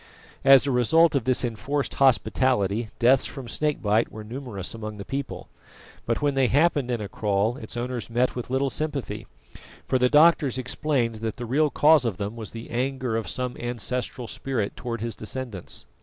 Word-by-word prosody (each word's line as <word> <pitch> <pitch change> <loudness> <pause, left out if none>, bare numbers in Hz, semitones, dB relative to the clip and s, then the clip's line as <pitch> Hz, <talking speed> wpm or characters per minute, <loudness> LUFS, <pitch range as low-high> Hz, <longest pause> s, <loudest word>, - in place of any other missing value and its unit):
As 135 -1 +7
a 140 - 0
result 160 +7 +4
of 140 -5 0
this 130 -1 +2
enforced 125 +5 -2
hospitality 120 -5 +2
deaths 125 +2 +4
from 135 -4 -8
snake 150 +4 -1
bite 105 +2 +2
were 110 - -8
numerous 115 -4 -6
among 110 -2 -6
the 100 - -7
people; 140 0 -5 0.6
but 115 +5 -1
when 145 -1 +2
they 135 -1 +3
happened 145 -1 +2
in 120 -2 -1
a 105 - -4
kraal 105 +3 0
its 110 -1 -8
owners 120 0 -3
met 120 +2 +1
with 125 -1 -5
little 135 +1 0
sympathy, 145 -8 -4 0.6
for 130 - +1
the 125 0 +3
doctors 150 -3 +5
explained 130 -2 -1
that 110 0 -4
the 120 - -6
real 145 +6 +2
cause 150 -1 +5
of 115 -7 -2
them 100 +2 -4
was 110 -2 -6
the 115 0 -9
anger 130 -1 -1
of 110 -5 -2
some 125 +6 -3
ancestral 120 +1 -3
spirit 115 -4 -3
towards 115 -3 -5
his 115 -1 -3
descendants. 110 -4 -6
125 Hz, 185 wpm, -25 LUFS, 115-135 Hz, 0.6 s, As